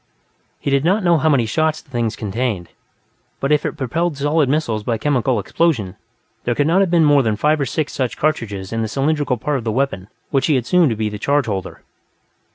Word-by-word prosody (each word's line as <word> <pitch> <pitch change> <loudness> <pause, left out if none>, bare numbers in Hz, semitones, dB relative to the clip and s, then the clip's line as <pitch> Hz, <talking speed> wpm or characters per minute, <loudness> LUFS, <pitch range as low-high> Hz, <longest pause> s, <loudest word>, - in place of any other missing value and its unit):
He 140 - -3
did 140 0 +2
not 190 +5 +2
know 170 -2 +4
how 160 - +2
many 135 -6 +3
shots 155 +6 0
the 140 - -21
thing 120 -2 0
contained, 105 -3 -3 0.7
but 135 - -1
if 150 - +2
it - - -6
propelled 160 +4 -1
solid 145 0 +1
missiles 130 -7 0
by 115 +1 -1
chemical 130 -2 +1
explosion, 105 - 0 0.5
there 120 - 0
could 145 - +1
not 170 +5 +3
have 195 - +2
been 170 -2 +4
more 145 -1 +5
than 110 -4 0
five 150 +6 +1
or 140 - 0
six 155 +4 -2
such 130 -3 -2
charges 105 -10 -2
in 115 - -1
the 110 - -1
cylindrical 140 +1 0
part 145 +4 -1
of - - -8
the 110 - -1
weapon 120 -6 -1 0.2
which 135 - +1
he 155 - +3
had 125 - +1
assumed 175 +4 +3
to 115 - -1
be 110 0 -1
the 105 -1 -5
charge 145 +2 +1
holder. 95 -4 -5
135 Hz, 225 wpm, -19 LUFS, 115-155 Hz, 0.7 s, more